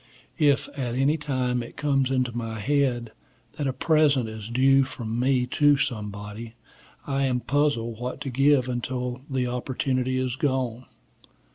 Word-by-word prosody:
If, 145 -3 +3
at 125 -4 -4
any 135 +4 +3
time, 130 -5 -1
it 120 - -10
comes 135 -3 +1
into 130 -3 0
my 115 -1 -4
head 125 -2 0 0.5
that 145 - 0
a - - +1
present 145 -4 +2
is 110 -1 -7
due 135 +3 +4
from 115 -3 -4
me 130 0 +2
to 145 +2 +3
somebody, 105 -2 -4 0.5
I 135 -1 0
am 125 -2 +1
puzzled 120 -5 0
what 125 +2 -4
to 135 -3 -4
give 135 0 +3
until 125 0 -3
the 130 -2 0
opportunity 130 +1 -1
is 130 -1 -1
gone. 130 -3 -1
130 Hz, 150 wpm, -25 LUFS, 120-135 Hz, 0.5 s, due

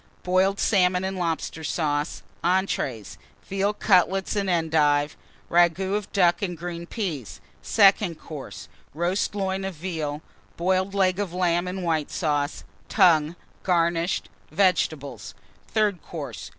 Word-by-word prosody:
Boiled 190 +2 +2
Salmon 180 -2 +3
and 190 0 -2
Lobster 165 -2 -3
Sauce. 150 -1 -1 0.2
ENTREES. 170 - -1 0.3
Veal 195 +1 0
Cutlets 195 -1 +2
and 200 -2 0
Endive. 155 -3 +2 0.3
Ragoût 175 +3 +3
of 210 -2 -4
Duck 175 -3 +3
and 180 -4 -3
Green 170 0 -6
Peas. 165 - -4 0.2
SECOND 195 -5 +4
COURSE. 150 -4 -9 0.3
Roast 180 +5 0
Loin 190 -1 -1
of 190 -2 -4
Veal. 155 -3 -4 0.3
Boiled 185 +3 0
Leg 185 -1 +2
of 185 -4 -3
Lamb 175 -1 +1
and 185 0 -4
White 160 -3 0
Sauce. 145 -2 -1 0.3
Tongue, 170 -5 +4 0.3
garnished. 170 -1 +1 0.2
Vegetables. 140 - 0 0.3
THIRD 210 -5 +1
COURSE. 140 - -7
175 Hz, 125 wpm, -25 LUFS, 160-190 Hz, 0.3 s, SECOND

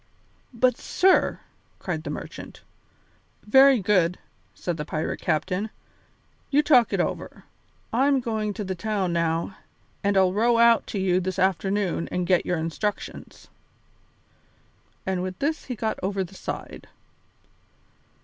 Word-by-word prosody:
"But, 250 0 +2
sir 380 +1 +2 0.2
" - - -39
cried 175 -4 -3
the 165 - -6
merchant. - - -8 0.8
"Very 265 +3 +6
good," 180 -3 +2 0.4
said 175 -2 -3
the 150 - -3
pirate 155 +1 -3
captain, 180 +6 -1 0.8
"you 290 +1 +3
talk 250 -6 +5
it - - 0
over. - - -3 0.5
I'm 270 +3 +3
going 220 -3 -2
to 215 - -4
the 190 -1 -3
town 195 -1 -2
now 170 +2 -1 0.5
and 200 -1 +2
I'll 185 -1 +4
row 230 +3 +3
out 235 0 +5
to 200 - -3
you 185 -1 +2
this 185 0 -3
afternoon 190 -1 0
and 180 0 -1
get 180 0 +2
your 180 - 0
instructions." 165 +6 -4 1.6
And 190 -1 -1
with 185 0 -4
this 310 +2 -2
he 250 - -4
got 220 0 -2
over 195 0 -1
the 185 +1 -11
side. - - -7
195 Hz, 140 wpm, -25 LUFS, 180-230 Hz, 1.6 s, Very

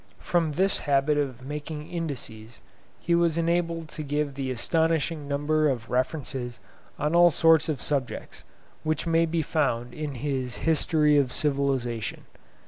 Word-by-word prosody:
From 165 -3 0
this 190 +5 +3
habit 140 +2 +3
of 130 -3 -3
making 150 +1 -6
indices, 120 - -5 0.4
he 170 - -1
was 170 -1 +3
enabled 170 -1 0
to 155 - -7
give 145 0 -1
the 135 -1 -3
astonishing 160 +3 0
number 150 +2 +1
of 120 -4 -3
references 125 -2 -2 0.4
on 150 +2 -1
all 175 0 +7
sorts 165 0 +4
of 150 - -2
subjects, 140 -4 -3 0.4
which 155 0 -1
may 165 0 +3
be 165 0 0
found 125 -6 -1
in 150 -3 -5
his 130 -2 -3
'History 155 -2 +3
of 130 -3 0
Civilisation. 135 -6 -1
150 Hz, 140 wpm, -26 LUFS, 130-160 Hz, 0.4 s, all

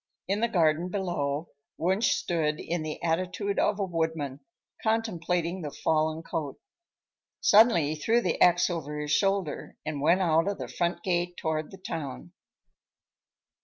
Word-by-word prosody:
In 200 +2 0
the 235 - +2
garden 170 -4 +2
below 170 -6 -2 0.3
Wunsch 190 +6 +2
stood 155 -3 -1
in 170 0 -2
the 155 -1 -5
attitude 185 +4 -1
of 205 0 +1
a - - +1
woodman, 160 -6 -2 0.4
contemplating 180 -5 0
the 150 - -4
fallen 155 +2 0
cote. 150 -4 -4 0.8
Suddenly 200 -9 +5
he - - -4
threw 225 +10 +2
the 180 -7 -1
axe 175 0 +5
over 150 -3 -4
his 150 0 -3
shoulder 195 -2 0
and 150 -2 -3
went 170 +6 +4
out 165 0 +3
of 200 - -1
the - - -5
front 170 0 -2
gate 175 -1 -1
toward 155 -1 -2
the 195 - -11
town. 150 - -6
170 Hz, 150 wpm, -28 LUFS, 155-185 Hz, 0.8 s, Suddenly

